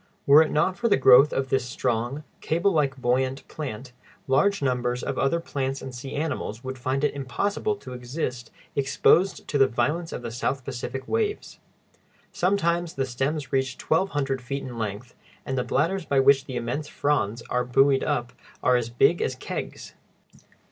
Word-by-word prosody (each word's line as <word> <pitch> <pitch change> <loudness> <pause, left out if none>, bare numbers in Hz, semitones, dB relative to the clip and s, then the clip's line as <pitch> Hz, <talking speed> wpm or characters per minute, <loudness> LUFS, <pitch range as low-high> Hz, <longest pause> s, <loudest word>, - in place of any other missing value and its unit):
Were 145 +2 +8
it 160 - +2
not 180 +5 +1
for 235 - +1
the 205 - +4
growth 135 +2 +7
of 135 0 -1
this 130 -1 +1
strong, 120 +3 -2 0.2
cable 170 +5 +1
like, 140 -6 +1
buoyant 130 +2 0
plant, 130 -4 -6 0.3
large 200 +8 +2
numbers 125 -1 0
of 135 - -3
other 135 +5 +2
plants 135 -4 -3
and 130 - -8
sea 125 +2 -7
animals 140 -6 -3
would 130 0 -6
find 130 +3 -1
it 145 - +2
impossible 200 - -1
to 130 -10 -10
exist 125 -1 -4 0.3
exposed 145 +7 +2
to 145 - 0
the 135 - +6
violence 150 +8 -1
of - - -6
the 115 - -5
South 130 +2 -2
Pacific 135 0 -5
waves. 435 -2 -2 0.7
Sometimes 175 -2 0
the 135 - 0
stems 135 +3 -3
reach 130 -1 0
twelve 185 +5 +1
hundred 135 -5 -1
feet 140 +2 -4
in 120 -3 -7
length, 110 +3 -5 0.3
and 135 - -2
the 125 - 0
bladders 180 +9 0
by 140 -2 +2
which 135 0 +5
the 130 - -6
immense 120 +5 -3
fronds 120 -6 -1
are 125 0 +1
buoyed 135 +2 +3
up 120 0 -1 0.3
are 125 - +4
as 120 -1 -2
big 145 +8 +3
as 130 - -1
kegs. - - -6
135 Hz, 175 wpm, -25 LUFS, 125-150 Hz, 0.7 s, Were